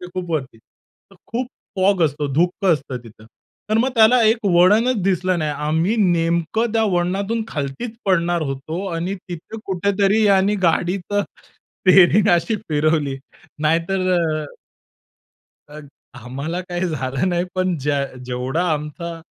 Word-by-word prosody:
ते 180 - -8
खूप 180 -2 -4
वरती. 130 -8 -3
तर - - -29
खूप 245 +2 -3 0.3
फॉग 190 -1 +2
असतो, 145 -1 -1
धुकं 180 +3 +2
असतं 135 -4 -3
तिथं. 110 -1 -15 0.5
तर 215 - +3
मग 250 +3 +2
त्याला 230 +2 +6
एक 220 0 +2
वळणचं 205 +7 +4
दिसलं 185 -1 +1
नाही. 155 -2 -1
आम्ही 155 +7 0
नेमकं 170 +4 +1
त्या 225 -1 +2
वळणातून 195 +5 -1
खालतीचं 145 - -4
पडणार 175 -3 +1
होतो 155 +8 -5
आणि 175 +4 -2
तिथे 175 +6 -8
कुठेतरी 200 +3 +1
याने 200 +1 +3
गाडीच 175 +3 +1
स्टीअरींग 195 -1 +2
अशी 170 +6 0
फिरवली. 150 -2 +1 0.5
नाहीतर 170 +4 +1
अ 170 - +1 1.4
अ, 150 +1 -10 0.4
आम्हाला 140 +8 -5
काही 180 0 -3
झालं 135 +2 -2
नाही. 175 0 0
पण 185 -1 0
ज्या 140 0 0 0.2
जेवढा 130 +6 -2
आमचा 165 +3 -5
175 Hz, 135 wpm, -20 LUFS, 155-195 Hz, 1.4 s, त्याला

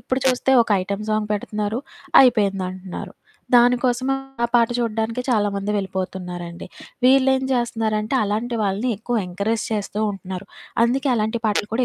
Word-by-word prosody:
ఇప్పుడు 260 +1 -2
చూస్తే 255 0 +2
ఒక 225 - -11
ఐటెమ్ 200 +2 -4
సాంగ్ 215 -1 0
పెడతన్నారు, 210 +2 -3 0.4
అయిపోయిందంటన్నారు. 195 -6 0 0.4
దాని 245 +1 +6
కోసం 250 +1 +1 0.4
ఆ - - +3
పాట 235 -1 +5
చూడడానికే 230 +1 -1
చాలా 210 -4 +2
మంది 200 +1 -2
వెళ్ళిపోతున్నారండి. 180 -3 -5 0.4
వీళ్ళేం 265 0 +4
జేస్తన్నారంటే, 225 -1 -1
అలాంటి 225 +4 -2
వాళ్ళని 205 +6 0
ఎక్కువ 235 +1 -1
ఎంకరేజ్ 205 +5 -1
చేస్తూ 210 0 -2
ఉంటున్నారు. 190 -1 -7 0.4
అందుకే 265 +3 +1
అలాంటి 220 +1 -1
పాటలు 210 0 0
కూడా 250 +1 +2
215 Hz, 135 wpm, -22 LUFS, 200-240 Hz, 0.4 s, దాని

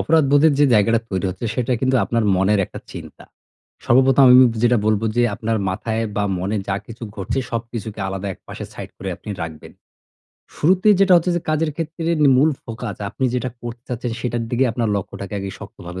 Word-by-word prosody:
অপরাধবোধের 150 -1 +4
যে 145 - +5
জায়গাটা 110 +2 +3
তৈরি 95 -1 -2
হচ্ছে, 95 +6 -5
সেটা 125 +1 -1
কিন্তু 130 0 +2
আপনার 115 +3 0
মনের 95 +2 +2
একটা - - -9
চিন্তা। - - -10 0.6
সর্বপ্রথম 130 +2 +5
আমি 125 - +9 0.3
যেটা 120 0 +4
বলব 110 0 +2
যে 120 - +4
আপনার 115 +1 -2
মাথায় 110 +4 -2
বা 100 - +1
মনে 95 +4 -2
যা 95 - 0
কিছু 115 +1 -11
ঘটছে 100 +6 -3
সবকিছুকে 115 -2 -5
আলাদা 95 +1 -4
একপাশে - - -9
সাইড - - -8
করে - - -5
আপনি - - -9
রাখবেন। 80 -2 -8 0.8
শুরুতেই 185 +6 +4
যেটা 195 -2 +5
হচ্ছে 175 +1 +1
যে - - 0
কাজের 155 0 +1
ক্ষেত্রে 165 0 -3 0.3
মূল 145 +5 +4
ফোকাস 115 -2 -6
আপনি 130 +5 -4
যেটা 125 +1 -1
করতে 120 0 -7
চাচ্ছেন 120 -1 -3
সেটার 120 -1 -2
দিকে 125 +2 +2
আপনার 115 0 -1
লক্ষ্যটাকে 100 +1 -6
আগে 100 0 -4
শক্তভাবে 90 -1 -9
115 Hz, 180 wpm, -20 LUFS, 105-135 Hz, 0.8 s, আমি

